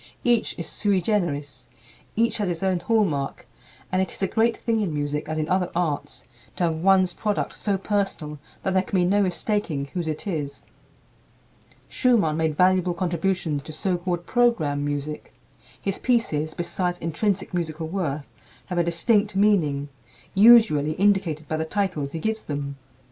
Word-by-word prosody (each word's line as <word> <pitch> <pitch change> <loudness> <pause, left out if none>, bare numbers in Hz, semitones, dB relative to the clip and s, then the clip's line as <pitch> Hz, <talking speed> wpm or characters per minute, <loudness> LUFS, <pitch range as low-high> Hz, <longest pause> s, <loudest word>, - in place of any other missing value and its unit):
Each 240 -2 +2
is 170 - -4
sui 200 +1 +1
generis, 170 -8 -2 0.5
each 230 +1 +2
has 205 -4 -1
his 170 +1 -3
own 190 -2 +1
hallmark, 175 -11 0 0.5
and 185 0 +2
it 190 - -2
is - - -6
a - - +3
great 230 +3 +1
thing 230 -1 0
in 200 -6 -1
music, 150 0 -2
as 155 - -2
in 155 -1 -1
other 185 0 +1
arts, 150 -4 -2 0.3
to - - -2
have 165 -2 +1
one's 185 +1 +4
product 210 -2 -2
so 200 -2 0
personal 190 -7 -2 0.2
that 190 - 0
there 190 - +4
can 190 - -2
be 180 - +3
no 200 +3 +3
mistaking 185 -6 -1
whose 175 -3 -2
it 155 +4 -4
is. 150 -7 -4 1.2
Schumann 225 - +2
made 160 -2 0
valuable 185 -1 +3
contributions 170 -3 -1
to 155 - -9
so 180 +4 0
called 175 -1 -3
program 170 -13 +2
music. 145 +1 -4 0.4
His 195 -1 -3
pieces, 155 -11 0
besides 175 +1 -1
intrinsic 180 +5 -1
musical 165 -2 -2
worth, 155 -5 -2 0.4
have 180 -2 -2
a - - +4
distinct 205 +5 +2
meaning, 160 -9 +2 0.4
usually 200 -9 +6
indicated 185 -5 +1
by 155 - -1
the 160 - -1
titles 160 -7 -2
he - - -3
gives 220 +6 -2
them. 140 -1 -4
175 Hz, 165 wpm, -24 LUFS, 155-200 Hz, 1.2 s, usually